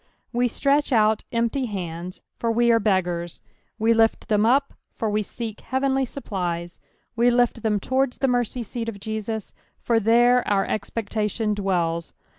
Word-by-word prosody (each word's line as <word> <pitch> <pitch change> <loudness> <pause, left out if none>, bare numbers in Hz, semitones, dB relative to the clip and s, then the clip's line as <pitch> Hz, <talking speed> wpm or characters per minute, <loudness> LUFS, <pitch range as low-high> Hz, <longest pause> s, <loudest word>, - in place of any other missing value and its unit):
We 245 +1 +2
stretch 280 +4 +1
out 215 -2 +3
empty 235 +2 0
hands, 180 -3 -6 0.2
for 230 - 0
we 235 +1 +3
are 230 - +4
beggars; 180 -5 0 0.4
we 225 +1 +3
lift 225 0 +2
ttiem 210 0 +3
up, 275 +3 +2 0.2
for 220 -2 -1
we 210 +1 +1
seek 220 +1 -6
heavenly 265 0 0
supplies; 175 -9 -4 0.4
we 235 +1 +4
lift 240 -1 +2
them 210 -2 +1
towards 260 +4 0
the 270 - +1
merry 245 -1 +2
seat 230 0 -5
of 200 -3 -8
Jesus, 220 0 -4 0.3
for 230 -1 +2
there 240 +3 +4
our 200 -1 +2
expectation 215 0 -2
dwells. 175 -5 -1
225 Hz, 155 wpm, -24 LUFS, 200-245 Hz, 0.4 s, are